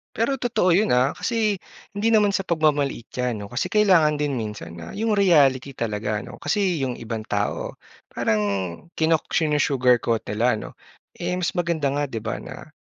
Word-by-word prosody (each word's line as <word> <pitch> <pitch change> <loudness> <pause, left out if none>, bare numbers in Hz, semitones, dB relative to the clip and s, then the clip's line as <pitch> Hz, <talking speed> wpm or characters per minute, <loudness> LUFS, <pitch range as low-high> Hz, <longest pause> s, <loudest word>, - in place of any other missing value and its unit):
Pero 260 +4 0
totoo 230 -7 +1
yun, 210 +3 +2
ah. 130 +3 +3
Kasi 215 -5 0 0.4
hindi 205 +2 0
naman 210 -2 +4
sa 195 - 0
pagmamaliit 145 -7 +1
yan 125 -4 -2
'no. 100 - -7
Kasi 125 - -1
kailangan 185 -8 +4
din 145 -2 0
minsan 105 -7 -6
na 80 -1 -8
yung 220 0 +1
reality 140 -8 +4
talaga 105 -2 -2
'no, - - -11
kasi 180 +2 0
yung 125 -2 -2
ibang 115 -1 -5
tao - - -2 0.4
parang 110 -1 +1 0.6
kino 160 0 +3
sinu-sugarcoat 130 -7 +2
nila 115 +4 +1
'no? - - -7 0.5
Eh - - -2
mas 175 -1 0
maganda 170 -4 0
nga 145 +1 -1
'di 115 -4 -5
ba 115 - -3
na - - -10
145 Hz, 170 wpm, -23 LUFS, 120-185 Hz, 0.6 s, naman